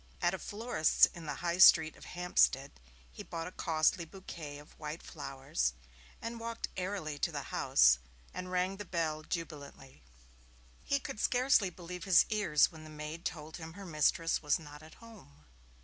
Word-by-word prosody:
At 175 - +2
a 190 - -3
florist's 210 -6 +3
in 165 -2 -9
the - - -3
High 170 +1 0
Street 160 -4 +8
of - - -13
Hampstead 175 -6 +2 0.4
he - - -9
bought 165 -1 -5
a 180 - -6
costly 165 0 +1
bouquet 165 -4 -9
of 145 0 -16
white 155 +1 -6
flowers, 135 - -3 0.5
and 230 0 -5
walked 230 0 -4
airily 180 -6 -3
to - - 0
the - - -6
house - - +5 0.3
and 185 0 -6
rang 185 +1 0
the 205 - -5
bell 165 -4 -2
jubilantly. 150 -5 -7 0.8
He 280 - +1
could 215 - -7
scarcely 245 -6 +3
believe 180 0 -8
his 190 -3 +6
ears 205 -9 +3
when 160 -2 -12
the 155 - -11
maid 155 +2 -7
told 155 -2 -5
him 160 -1 -8
her 200 +2 -9
mistress 165 0 +1
was 150 -1 +2
not 150 -2 -12
at 155 0 -14
home. 75 - -16
165 Hz, 170 wpm, -33 LUFS, 150-185 Hz, 0.8 s, Street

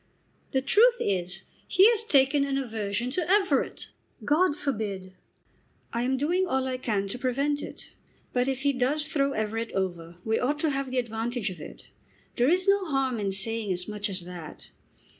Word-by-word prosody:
"The 265 -2 +1
truth 465 - +6
is 185 -1 -2 0.2
he 385 +3 +6
has 455 -1 0
taken 280 -6 +4
an 275 -1 -1
aversion 225 -2 -2
to 345 +3 -1
Everett." 390 0 +1 0.3
"God 300 +1 +3
forbid!" 205 -8 -3 0.8
"I 235 - 0
am 260 +2 +1
doing 350 +7 +1
all 265 -4 0
I 255 -1 -2
can 210 -6 -1
to 245 - -5
prevent 280 +3 0
it. - - -9 0.4
But 250 0 +1
if 265 -1 -1
he 280 0 +2
does 280 +4 0
throw 280 -2 +1
Everett 220 +1 -2
over 175 -3 -3
we 220 0 +1
ought 285 +4 0
to 315 - +2
have 275 -1 -2
the 255 - -3
advantage 230 -2 -2
of 175 -4 -10
it. - - -11 0.5
There 245 +2 +3
is 370 +3 +2
no 395 -1 +4
harm 270 -6 0
in 200 -2 -1
saying 210 +2 -1
as 180 0 -1
much 210 0 -1
as 185 -1 -4
that. 170 -3 -10
255 Hz, 180 wpm, -27 LUFS, 210-285 Hz, 0.8 s, truth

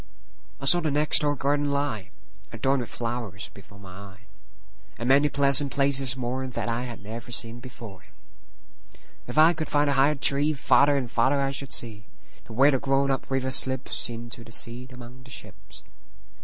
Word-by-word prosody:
I - - -7
saw 175 +5 +7
the 160 -2 -2
next 150 +1 +4
door 145 -1 -1
garden 145 +1 -1
lie, 140 -8 -3 0.4
Adorned 135 0 -1
with 120 - -8
flowers, 115 -5 -5
before 100 +1 -17
my 100 -2 -14
eye, 100 0 -13 0.8
And 120 - -5
many 140 +2 +4
pleasant 140 0 +3
places 135 -2 +2
moreThat 125 -2 -5
I 120 +1 -3
had 120 -4 -10
never 115 +3 -9
seen 120 0 -2
before. 115 -6 -12 1.2
If 120 - -7
I 160 +2 +6
could 155 -1 -6
find 145 0 +1
a - - +1
higher 140 +2 +2
treeFarther 140 0 +2
and 125 -4 -5
farther 135 +4 +1
I 135 0 -1
should 140 0 -4
see, 110 -5 0 0.4
To - - -12
where 135 +5 +4
the 135 - 0
grown 135 +1 0
up 135 - -4
river 135 -1 -2
slipsInto 120 -2 0
the 115 - -14
sea 120 +2 +1
among 125 0 -13
the 130 - -17
ships. - - -13
130 Hz, 170 wpm, -24 LUFS, 120-140 Hz, 1.2 s, saw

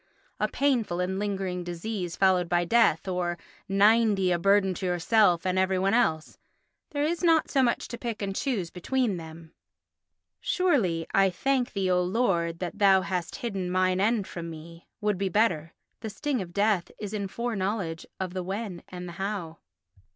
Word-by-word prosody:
"A - - +2
painful 240 -11 0
and 185 +1 -1
lingering 190 -3 -2
disease 175 +1 -4
followed 185 -3 +3
by 175 0 +2
death" 215 -4 +3
or 180 -2 -1 0.3
"Ninety, 205 -1 +4
a 175 - +1
burden 195 0 +3
to 185 - -5
yourself 180 0 +3
and 185 0 +1
every 190 0 +2
one 195 +2 +1
else"—there 235 - -2
is 335 +4 -1
not 325 -2 +3
so 275 - +3
much 240 -2 +1
to 235 - -6
pick 230 -3 -4
and 195 -2 -3
choose 205 -11 -2
between 220 +2 -1
them. 160 0 -11 0.9
Surely, 220 - +1
"I 195 0 +5
thank 255 +6 0
thee, 190 -2 0
O 180 0 +3
Lord, 180 -4 0
that 175 -1 -5
thou 195 -2 +6
hast 180 -3 -3
hidden 195 -6 -3
mine 185 0 +1
end 215 -1 +2
from 170 -2 -7
me" 165 +1 -11
would 210 -3 0
be 195 -1 0
better. 170 -6 +1 0.3
The 220 - -5
sting 255 +4 -2
of 175 -2 -7
death 200 -1 +1
is 210 -1 -6
in 200 -2 -2
foreknowledge 195 -6 -3
of 185 -2 -3
the 185 - -2
when 190 0 -5
and 180 0 -7
the 175 - -8
how. 190 -6 -4
190 Hz, 175 wpm, -27 LUFS, 175-220 Hz, 0.9 s, thou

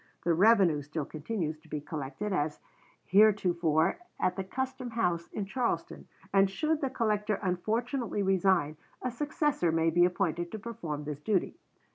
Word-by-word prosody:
The 170 - +3
revenue 190 -5 +5
still 150 +1 -4
continues 155 0 -4
to - - -21
be 150 - -3
collected 150 +7 -4
as 150 -3 -1 0.5
heretofore 180 - +3 0.2
at 180 - +1
the 195 - -3
custom 260 +5 -4
house 175 -8 0
in 205 - -3
Charleston, 240 +4 -2 0.3
and 195 0 +5
should 305 +10 0
the 270 - 0
collector 210 -3 0
unfortunately 220 +5 -1
resign, 185 -5 +2 0.3
a 255 - -1
successor 290 - 0
may 165 0 +2
be 175 +2 +4
appointed 175 -2 -1
to - - -3
perform 175 -10 -5
this 145 -1 -6
duty." 195 +2 0
190 Hz, 150 wpm, -30 LUFS, 165-225 Hz, 0.5 s, revenue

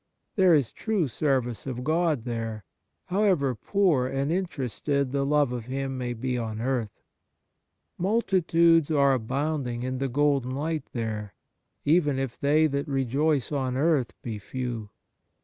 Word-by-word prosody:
There 185 -4 +6
is 135 -7 +1
true 210 -8 -1
service 130 -4 -1
of 125 -1 -4
God 155 -3 +1
there, 115 -3 -4 0.4
however 180 -8 +2
poor 155 - +1
and 135 +3 -1
interested 140 - -1
the 140 0 0
love 145 -2 +2
of 120 -3 -4
Him 135 +1 -3
may 125 -1 -3
be 125 +1 -2
on 110 -2 -4
earth. 120 -4 -2 1.0
Multitudes 170 -5 +3
are 140 -3 +4
abounding 130 0 -2
in 130 0 -3
the 135 0 -1
golden 135 -1 +1
light 155 0 -2
there, 110 -3 -4 0.5
even 150 -3 +3
if 135 -3 -3
they 150 +3 +4
that 140 -1 -1
rejoice 140 +2 0
on 130 -3 -1
earth 145 -4 +2
be 110 -3 -4
few. 120 -1 -5
135 Hz, 140 wpm, -27 LUFS, 125-155 Hz, 1.0 s, There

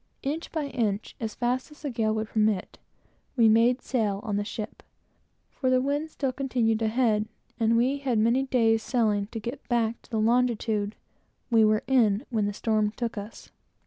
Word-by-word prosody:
Inch 305 +5 -3
by 315 -2 -2
inch, 225 -6 -2
as 220 -2 -4
fast 250 +3 -1
as 300 - -16
the 285 - -2
gale 220 -2 0
would 215 0 -3
permit, 215 -3 0 0.6
we 230 -3 +5
made 235 +3 +4
sail 215 -6 0
on 210 - -2
the 205 - 0
ship, 215 +1 -6 0.7
for 260 - -1
the 255 0 +4
wind 285 +4 -1
still 275 -3 -2
continued 245 -4 0
a 220 - +2
head, 220 -2 +1 0.3
and 230 0 +3
we 260 +4 +2
had 260 -4 0
many 230 +4 +3
days' 230 -4 +2
sailing 215 -5 +1
to 225 - -6
get 235 +7 -7
back 235 -1 0
to - - -22
the 225 -3 -1
longitude 220 -2 +1 0.6
we 225 -1 +5
were 215 0 +3
in 230 -2 +3
when 215 -3 +1
the - - -1
storm 215 0 +1
took 235 -1 -3
us. 205 +1 -9
230 Hz, 185 wpm, -27 LUFS, 215-255 Hz, 0.7 s, we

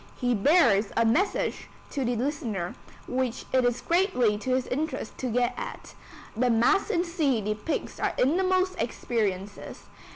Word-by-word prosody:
He 245 -1 0
bears 225 - +4
a 230 - +4
message 340 - 0 0.2
to 275 - -2
the 245 0 0
listener, 230 - -2 0.3
which 255 -1 -2
it 260 -1 +4
is 245 0 +1
greatly 335 - +2
to 255 +4 0
his 255 -1 0
interest 300 -4 -3
to 260 - -2
get 245 +1 +1
at. - - -7 0.4
The 250 +2 +2
Mass 240 - +3
in 350 -5 +1
C 315 - 0
depicts 210 +8 -3
our - - 0
innermost 370 +6 +2
experiences. 205 -4 -3
250 Hz, 150 wpm, -27 LUFS, 225-315 Hz, 0.4 s, bears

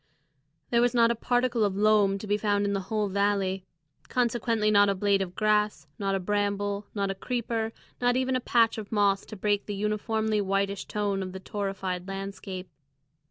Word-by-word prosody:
There 235 0 +4
was 245 0 +2
not 230 -1 +5
a - - 0
particle 245 0 +1
of 200 -2 +1
loam 205 -2 +4
to 200 - -7
be 205 0 +1
found 205 -1 +1
in 200 - 0
the 195 - 0
whole 215 -2 0
valley, 195 -1 0 0.4
consequently 230 -3 +1
not 205 -1 +5
a 200 - +1
blade 200 0 +2
of 185 -2 -4
grass, 210 -6 +1
not 195 -1 0
a - - 0
bramble, 205 +1 -1
not 200 -1 0
a - - -2
creeper, 225 +1 -2 0.3
not 245 0 +3
even 260 0 +1
a - - +2
patch 230 -2 +3
of 210 - -8
moss 200 -2 +2
to - - -8
break 205 0 0
the 205 - -3
uniformly 215 +1 0
whitish 195 0 -1
tone 205 -2 -1
of 185 -1 -5
the 190 - -6
torrified 195 -3 -4
landscape. 195 -1 -6
205 Hz, 190 wpm, -27 LUFS, 195-220 Hz, 0.4 s, not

